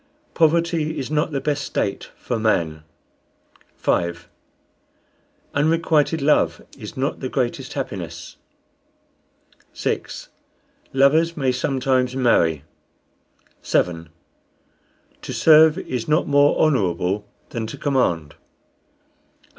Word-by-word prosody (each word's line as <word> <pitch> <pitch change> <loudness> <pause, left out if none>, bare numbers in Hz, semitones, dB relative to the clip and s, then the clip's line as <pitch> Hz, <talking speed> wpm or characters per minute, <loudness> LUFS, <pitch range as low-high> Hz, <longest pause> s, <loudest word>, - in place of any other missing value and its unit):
Poverty 165 -1 +1
is 140 0 -4
not 150 +1 +1
the 140 -3 -2
best 145 0 -1
state 100 - -3
for 120 -3 -3
man. 80 -8 0 0.9
5. 85 0 -1 1.3
Unrequited 160 0 +1
love 150 +1 +2 0.2
is - - -10
not 135 +3 -2
the 130 - -4
greatest 125 -3 -2
happiness. - - -6 1.4
6. - - -4 0.6
Lovers 155 +5 +3
may 135 -3 +1
sometimes 130 0 0
marry. 85 - +2 1.0
7. 85 -2 0 1.1
To - - -6
serve 160 +1 +6
is 125 -10 -4
not 155 +2 +2
more 145 0 +4
honorable 100 - +1 0.2
than 115 -2 -3
to - - -8
command. 85 - 0 1.1
8. - - -30
135 Hz, 100 wpm, -22 LUFS, 110-155 Hz, 1.4 s, serve